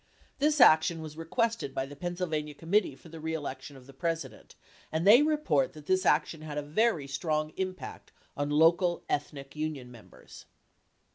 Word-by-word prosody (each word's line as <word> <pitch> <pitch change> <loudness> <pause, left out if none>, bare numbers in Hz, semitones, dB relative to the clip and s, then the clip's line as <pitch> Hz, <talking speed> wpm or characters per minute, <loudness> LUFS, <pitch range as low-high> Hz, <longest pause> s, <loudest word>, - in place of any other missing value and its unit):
This 300 +1 +2
action 160 -6 +6
was 155 -1 -8
re 165 0 -8
quested 230 - -1
by 135 - -1
the 145 +1 -11
Pennsylvania 160 -2 -3
Committee 180 +7 +1
for 165 - -16
the 165 0 -10
Re 160 +1 -3
Election 140 -2 -6
of 130 - -15
the 135 - -14
President, 165 +4 -4 0.4
and 160 +2 -1
they 225 +7 +8
report 295 - +1
that 150 -1 -12
this 185 +1 +1
action 160 - +2
had 150 -1 -6
a 150 - -2
very 165 +1 +1
strong 155 +2 -2
impact 185 -1 -6 0.2
on 145 +1 -2
the 145 - 0
local 175 +3 +3
ethnic 145 -1 -4
union 150 -5 -4
members. 115 -3 -15
155 Hz, 180 wpm, -29 LUFS, 145-180 Hz, 0.4 s, they